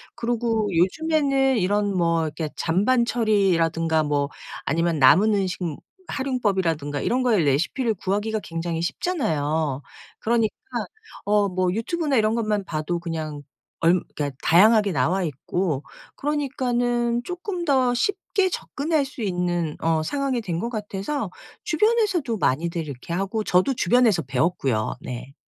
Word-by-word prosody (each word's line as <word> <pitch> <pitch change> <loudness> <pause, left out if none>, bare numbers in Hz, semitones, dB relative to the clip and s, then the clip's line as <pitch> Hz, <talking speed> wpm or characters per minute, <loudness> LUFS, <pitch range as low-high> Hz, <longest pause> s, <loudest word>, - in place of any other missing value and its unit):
그리고 230 -2 0
요즘에는 275 - +2
이런 205 0 +1
뭐 165 -2 +2
이렇게 155 0 -4
잔반 210 +9 +2
처리라든가 170 -9 +2
뭐 145 -1 0 0.4
아니면 165 -1 0
남은 195 +11 +6
음식 190 -2 -1
무 160 -4 -3 0.3
활용법이라든가 190 - -1
이런 255 - 0
거에 235 -5 +3
레시피를 170 - +1
구하기가 210 +4 -1
굉장히 165 0 -3
쉽잖아요. 160 - -1 0.4
그러니까 225 -1 +1 0.7
어 205 0 +3
뭐 185 -1 0
유튜브나 285 - 0
이런 215 0 +2
것만 215 -3 -1
봐도 165 +2 -2
그냥 155 -3 -5 0.4
얾 170 +2 +4
그러니까 145 -1 -2
다양하게 210 +3 +5
나와 175 +6 +1
있고 155 0 -2 0.3
그러니까는 245 -5 0
쪼끔 360 - -4
더 260 -4 +3
쉽게 380 +6 0
접근할 305 -3 -1
수 270 -2 -9
있는 175 -5 -1
어 160 -1 +1
상황이 275 - -1
된 175 -6 -3
것 235 - -2
같아서 210 +2 -3 0.3
주변에서도 375 - +1
많이들 165 +3 0
이렇게 140 +4 -7
하고 195 +5 -1
저도 185 +9 +3
주변에서 225 -5 +3
배웠고요, 135 -4 0
네. 125 +2 -7
200 Hz, 320 characters per minute, -24 LUFS, 165-245 Hz, 0.7 s, 남은